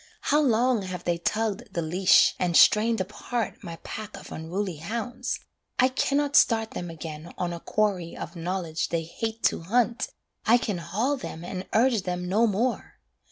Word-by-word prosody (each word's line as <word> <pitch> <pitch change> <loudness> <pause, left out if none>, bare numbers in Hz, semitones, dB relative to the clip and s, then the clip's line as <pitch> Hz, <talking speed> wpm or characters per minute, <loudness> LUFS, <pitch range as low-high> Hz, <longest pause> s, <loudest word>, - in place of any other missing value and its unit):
How 295 +2 +3
long 245 -3 +3
have 185 -2 -5
they 170 -1 0
tugged 220 +5 -2
the 170 - 0
leash, 180 +4 +5
and 175 -2 +2
strained 225 +2 +5
apart 210 +3 -3
My 170 - -6
pack 215 -1 -7
of - - -12
unruly 175 +2 -3
hounds: 225 +10 -3 0.4
I 255 - +5
cannot 280 +2 0
start 225 -1 +4
Them 175 - -5
again 160 0 -7
on 175 -1 -2
a 170 - -6
quarry 190 -4 -1
of - - -7
knowledge 170 -1 -2
they 165 -1 -1
hate 225 +7 -5
to - - +2
hunt, 235 +6 +1 0.4
I 235 - +5
can 210 -6 -2
haul 220 - -1
them 170 -9 -7
and 185 +1 -5
urge 235 -1 +4
them 180 -1 -3
no 215 +6 +3
more. 230 +5 -1
200 Hz, 170 wpm, -26 LUFS, 175-230 Hz, 0.4 s, leash